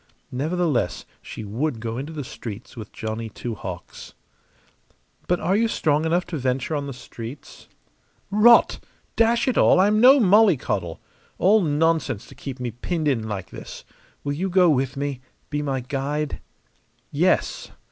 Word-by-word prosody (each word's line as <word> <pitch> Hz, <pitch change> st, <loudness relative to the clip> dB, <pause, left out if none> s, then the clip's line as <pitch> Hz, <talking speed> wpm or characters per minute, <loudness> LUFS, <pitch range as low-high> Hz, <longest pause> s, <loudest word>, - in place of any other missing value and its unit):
Nevertheless, 150 Hz, -, -1 dB, 0.2 s
she -, -, -8 dB
would 115 Hz, +5 st, -2 dB
go 115 Hz, +1 st, -4 dB
into 145 Hz, +4 st, -6 dB
the 150 Hz, -3 st, -5 dB
streets 115 Hz, -3 st, -8 dB
with 110 Hz, -2 st, -9 dB
Johnny 110 Hz, +1 st, -5 dB
Two 115 Hz, +2 st, -6 dB
Hawks. 90 Hz, -4 st, -8 dB, 1.1 s
"But 180 Hz, -, +1 dB
are 190 Hz, -, +1 dB
you 230 Hz, +2 st, +3 dB
strong 155 Hz, -7 st, +1 dB
enough 175 Hz, +2 st, +1 dB
to 165 Hz, -, -3 dB
venture 130 Hz, +4 st, -1 dB
on 145 Hz, -1 st, -3 dB
the -, -, -5 dB
streets?" 125 Hz, +1 st, -10 dB, 0.6 s
"Rot! 225 Hz, +4 st, +6 dB, 0.4 s
Dash 230 Hz, +2 st, +3 dB
it 255 Hz, -, +2 dB
all, -, -, +5 dB
I'm 210 Hz, +3 st, +4 dB
no 265 Hz, +3 st, +8 dB
mollycoddle! 180 Hz, -, +3 dB, 0.4 s
All 205 Hz, +5 st, +4 dB
nonsense 155 Hz, -, 0 dB
to -, -, -14 dB
keep 135 Hz, -2 st, -8 dB
me 125 Hz, -1 st, -3 dB
pinned 155 Hz, -, -3 dB
in 115 Hz, -6 st, 0 dB
like 100 Hz, -3 st, -5 dB
this. -, -, -10 dB, 0.4 s
Will 145 Hz, -, -2 dB
you 185 Hz, +6 st, -2 dB
go 180 Hz, -2 st, +5 dB
with 135 Hz, -1 st, 0 dB
me 140 Hz, -2 st, -3 dB, 0.3 s
be 145 Hz, 0 st, -1 dB
my 135 Hz, -3 st, -2 dB
guide?" 145 Hz, +3 st, -3 dB, 0.7 s
"Yes!" -, -, +1 dB
145 Hz, 155 wpm, -23 LUFS, 120-175 Hz, 1.1 s, no